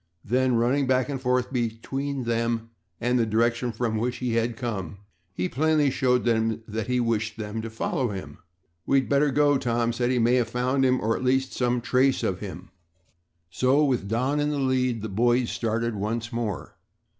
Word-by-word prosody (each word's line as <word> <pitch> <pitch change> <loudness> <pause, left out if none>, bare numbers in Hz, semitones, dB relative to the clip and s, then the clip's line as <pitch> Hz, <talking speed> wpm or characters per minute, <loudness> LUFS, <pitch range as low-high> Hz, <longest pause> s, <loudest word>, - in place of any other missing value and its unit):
Then, 125 +2 +2
running 125 +4 +2
back 130 +1 +2
and 135 -2 -3
forth 125 0 0
between 130 +4 -2
them 115 -1 -1 0.3
and 125 +1 +1
the 115 - +3
direction 115 +2 +1
from 110 0 -1
which 120 +3 -1
he 125 -2 -2
had 115 0 0
come, 100 -7 -4 0.3
he 90 0 -2
plainly 150 +3 +2
showed 125 -2 +1
them 115 -1 +1
that 110 +1 -4
he 125 0 +1
wished 110 -2 -1
them 110 0 -4
to 115 - -5
follow 115 +3 -1
him. 95 -2 -7 0.5
"We'd 135 -2 +3
better 145 +1 +3
go," 145 0 +3
Tom 120 -1 0
said. 120 +1 0
"He 130 - +1
may 120 +2 +3
have 120 -2 0
found 125 +3 0
him, 130 0 +3
or 115 +2 0
at - - -4
least 130 +1 +1
some 125 -1 0
trace 130 +2 +2
of 90 -1 -1
him." 95 -4 -8 0.8
So, 130 - +3
with 125 -8 0
Don 130 +7 0
in 145 0 +1
the 150 - -1
lead 130 -4 0
the - - -2
boys 120 +4 +1
started 115 +1 -1
once 110 +3 -3
more. 110 -8 -3
120 Hz, 190 wpm, -25 LUFS, 115-130 Hz, 0.8 s, the